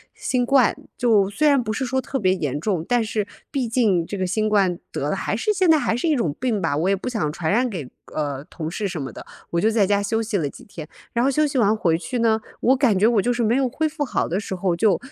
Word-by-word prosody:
新 260 - -1
冠， 265 -1 +4 0.2
就 215 -5 +3
虽 300 +10 +1
然 280 -3 +4
不 215 -2 -3
是 265 - -2
说 260 +1 0
特 260 +2 -3
别 185 -6 +2
严 145 -7 -2
重， 180 -2 -1
但 245 -2 +2
是 215 -2 -2 0.2
毕 270 -4 -1
竟 215 -8 +2
这 200 - -5
个 185 - -1
新 215 +4 0
冠 195 -4 +2
得 - - -2
的 - - 0
还 - - -2
是 430 - 0
现 370 -3 +2
在 315 - +7
还 255 - 0
是 245 - -1
一 310 - +3
种 170 - 0
病 235 -6 0
吧， 165 -4 0
我 170 +4 0
也 195 - +3
不 200 +6 -5
想 180 -11 -1
传 160 0 -2
染 245 +4 +2
给， 165 - -6 0.3
呃， 145 -3 -2
同 160 0 -6
事 205 +1 -2
什 175 -5 -4
么 135 -2 -5
的， - - -10 0.2
我 170 - 0
就 215 - +3
在 220 -3 +3
家 200 +1 +2
休 225 +3 -1
息 215 -2 -1
了 145 -5 -1
几 - - -14
天。 160 -6 -9 0.2
然 235 - 0
后 - - +4
休 305 +3 +2
息 280 -2 -2
完 215 -3 +3
回 170 -7 +1
去 245 +8 -4
呢， 225 -1 +3 0.2
我 260 - +4
感 245 -8 +3
觉 200 - +3
我 230 -4 +3
就 245 - +1
是 240 -1 -1
没 230 +3 +2
有 270 -1 +2
恢 310 +6 -1
复 300 -1 -3
好 - - -1
的 180 - 0
时 200 -2 -5
候， 180 -1 0
就 215 -1 +3
215 Hz, 305 characters per minute, -22 LUFS, 185-250 Hz, 0.3 s, 在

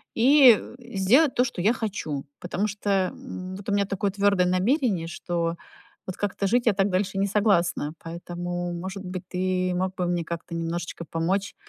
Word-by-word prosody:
и 255 -1 +7 0.2
сделать 245 +5 +3
то, 250 - +4
что 240 -8 -4
я 215 +6 +4
хочу. 185 - -4
Потому 185 +4 -2
что, 205 0 -4 0.2
м, 190 -8 -7
вот 200 +1 -7
у - - +1
меня 200 0 +2
такое 200 0 -1
твёрдое 200 -2 +2
намерение, 190 - +1
что 170 0 -2 0.5
вот 185 - -5
как-то 200 -1 -1
жить 240 +4 +2
я 215 - +5
так 195 +1 +1
дальше 195 +1 -1
не 200 - +2
согласна. 185 -7 +1
Поэтому, 175 +1 -5
может 190 +3 -6
быть, 180 -1 -5
ты 185 0 0
мог 185 +1 -1
бы 180 -2 -1
мне 175 -1 0
как-то 170 0 -6
немножечко 170 0 -4
помочь 185 +5 -1
185 Hz, 175 wpm, -25 LUFS, 175-205 Hz, 0.5 s, и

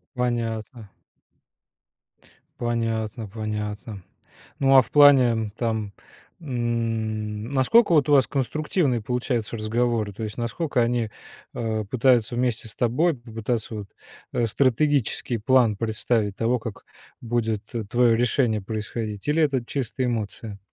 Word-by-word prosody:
Понятно. 115 -3 -3 1.7
Понятно, 115 -1 -2
понятно. 105 -1 -5 0.6
Ну, 135 0 +4
а 130 - +9
в - - -11
плане, 125 -7 +5
там, 110 -4 -2 0.5
м, 115 -5 -2
насколько, 145 - +4
вот, 150 -3 +4
у - - +5
вас 135 -2 +5
конструктивные 140 -1 0
получаются 120 0 -2
разговоры? 110 -1 0
То 110 - -6
есть, 105 +1 -5
насколько 125 +3 -1
они, 115 -1 0 0.4
а, 110 -2 -2
пытаются 120 +1 +2
вместе 120 -2 -1
с 110 - -8
тобой 140 +8 +1
попытаться 115 -1 -4
вот, 105 -2 -6 0.5
э, 120 - +1
стратегический 130 0 +1
план 115 -1 +3
представить 110 -1 -1
того, 115 +2 +1
как 110 -2 -8 0.4
будет 115 -3 -1 0.3
твое 120 -1 +4
решение 120 -2 +1
происходить, 105 +1 -5
или 155 +2 +3
это 135 -5 +1
чисто 130 0 -3
эмоция? 110 -3 -4
115 Hz, 120 wpm, -24 LUFS, 110-125 Hz, 1.7 s, а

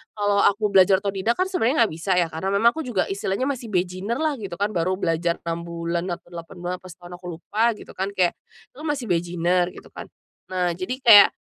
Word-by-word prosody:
kalau 205 -1 +1
aku 210 +1 +3
belajar 190 0 +6
otodidak 200 +3 -1
kan 370 - +2
sebenarnya 285 -8 +2
nggak - - -8
bisa 165 +4 -3
ya, 175 - +2
karena 175 +5 -3
memang 225 +4 +3
aku 320 - -3
juga 225 -7 0
istilahnya 195 +5 -2
masih 245 -5 -4
beginner 185 +6 -1
lah 310 -2 0
gitu 195 -5 -6
kan, 205 +1 0
baru 185 +2 0
belajar 170 -1 0
6 165 0 -2
bulan, 170 0 -3
apa 175 - -7
8 170 +1 -9
bulan 175 +1 -3
apa - - -10
setahun, 175 +1 -11
aku 180 - -15
lupa, 215 +5 -1
gitu - - -12
kan, 190 +2 -2
kayak, 185 -3 +1 0.4
"Lo 300 - -10
masih 290 -6 -2
beginner 175 0 +1
gitu - - -13
kan." - - -7 0.5
Nah, 180 -1 +1
jadi 215 +8 -4
kayak, 220 -5 +9
190 Hz, 215 wpm, -23 LUFS, 175-220 Hz, 0.5 s, kayak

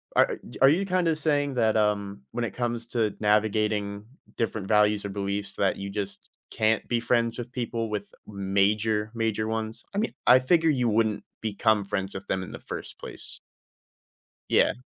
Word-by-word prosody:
a - - +4 0.2
are 135 - +8
you 185 +6 +2
kinda 180 -3 +2
saying 145 -3 +1
that, 110 -2 +3
um, 100 -6 0
when 120 - -2
it 105 - -5
comes 120 -1 -2
to 115 -4 0
navigating 105 -1 +1 0.3
different 110 -4 -2
values 105 -1 +3
or - - -3
beliefs 100 0 -3
that 100 - +1
you 100 0 -5
just 100 -1 -5 0.2
can't 110 0 +1
be 120 -1 +2
friends 115 -1 +1
with 120 0 -6
people 115 -3 -3
with 105 -1 -4
major, 105 +2 +1
major 110 -2 -1
ones? 110 +1 -3
I - - -4
mean, 225 - -1
I 130 - +8
figure 160 +5 +3
you 125 -5 +2
wouldn't 110 -1 +1 0.2
become 110 -1 +2
friends 95 0 -3
with 95 +1 -7
them 95 -1 -1
in - - -8
the - - -8
first - - -7
place. - - -6 1.1
Yeah. - - +4
110 Hz, 175 wpm, -27 LUFS, 100-120 Hz, 1.1 s, are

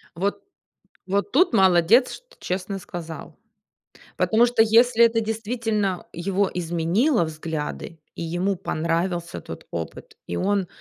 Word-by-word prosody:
Вот 195 +4 -2 0.7
вот 200 +2 0
тут 310 -1 +3
молодец, 190 +5 +5
что - - -14
честно 190 +2 -3
сказал. 165 -3 -8 0.8
Потому 230 +2 +4
что 240 -2 +3
если 230 +1 +5
это 230 0 +3
действительно 220 -3 -2
его 190 +3 0
изменило 175 - +1
взгляды, 160 0 -5
и - - -6
ему 175 +4 -1
понравился 170 0 -2
тот - - -10
опыт, 435 -3 -7
и - - -4
он 195 0 0
195 Hz, 120 wpm, -23 LUFS, 170-225 Hz, 0.8 s, молодец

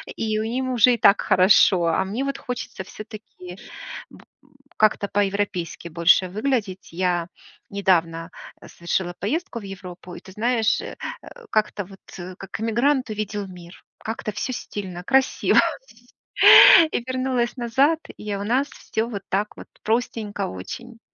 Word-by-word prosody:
и 215 -1 -1
у - - -1
ним 255 +3 -2
уже 245 0 +5
и - - -7
так 200 -1 +5
хорошо. 185 -1 +4
А 165 - +1
мне, 230 +8 -3
вот, 275 - -3
хочется 245 -5 -6
всё-таки 210 -4 -11 0.6
б - - -16
м - - -20 0.5
как-то 215 -1 +2
по-европейски 195 -5 -2
больше 170 +3 +4
выглядеть. 215 -3 -2
Я 175 -1 -1 0.4
недавно 170 -4 0 0.4
совершила 175 +1 -3
поездку 235 - -3
в - - -13
Европу, 185 -2 -9
и, - - -8
ты 190 - -14
знаешь, 225 0 +1
э - - -8 0.3
э, - - -13 0.2
как-то, 215 -2 0
вот, 195 +1 -15 0.4
как 195 +1 -8
эмигрант 245 +3 +1
увидел 210 -1 -4
мир. 180 -1 -13 0.2
Как-то 220 -1 -4
всё 255 - -3
стильно, 185 -6 -6
красиво. 265 +5 +3 1.3
И - - -2
вернулась 255 -1 -1
назад, 270 +7 +2 0.2
и 210 -1 -4
у 200 - -4
нас 255 +6 0
всё 220 +1 -4
вот 200 -4 -5
так 205 +2 -2
вот - - -11 0.2
простенько 220 -3 -2
очень. 225 - -8
210 Hz, 145 wpm, -23 LUFS, 185-235 Hz, 1.3 s, уже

